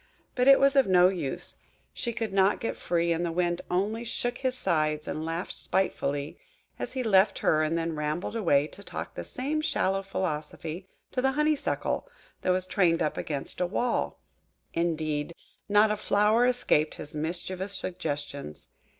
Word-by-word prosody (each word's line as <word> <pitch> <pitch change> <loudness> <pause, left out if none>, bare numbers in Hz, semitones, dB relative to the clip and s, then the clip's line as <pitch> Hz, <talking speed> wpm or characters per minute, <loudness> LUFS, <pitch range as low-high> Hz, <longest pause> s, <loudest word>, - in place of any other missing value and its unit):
But 250 0 +1
it 275 0 +9
was 275 0 +4
of 270 -5 +5
no 180 -1 +6
use–she 185 - -5
could 225 -3 -3
not 195 +1 +3
get 230 - -2
free; 170 0 0
and 165 +1 0
the 170 - -1
Wind 175 0 0
only 210 +6 0
shook 245 +1 -3
his 260 -1 0
sides 155 -6 +1
and 155 - -3
laughed 165 +3 -3
spitefully 145 -6 -1 0.4
as - - -4
he 260 -1 -1
left 195 -3 +4
her 155 - +4
and 155 +2 +1
then 165 -1 -2
rambled 150 +7 -2
away 150 -10 +3
to 185 - -12
talk - - -6
the - - -5
same 290 +5 -1
shallow 195 -11 +1
philosophy 165 -1 -4 0.2
to 255 - 0
the 265 +1 +2
Honeysuckle 300 0 0 0.3
that - - -1
was 185 0 +2
trained 180 -3 +2
up 150 - -1
against 145 +3 -4
a 180 - +2
wall. 240 +6 -1 0.5
Indeed, 160 -2 -1 0.3
not 210 +1 +5
a 210 - 0
flower 210 +4 +3
escaped 200 -11 +2
his 150 +1 -9
mischievous 180 +5 -3
suggestions. 145 - -5
180 Hz, 165 wpm, -28 LUFS, 155-220 Hz, 0.5 s, it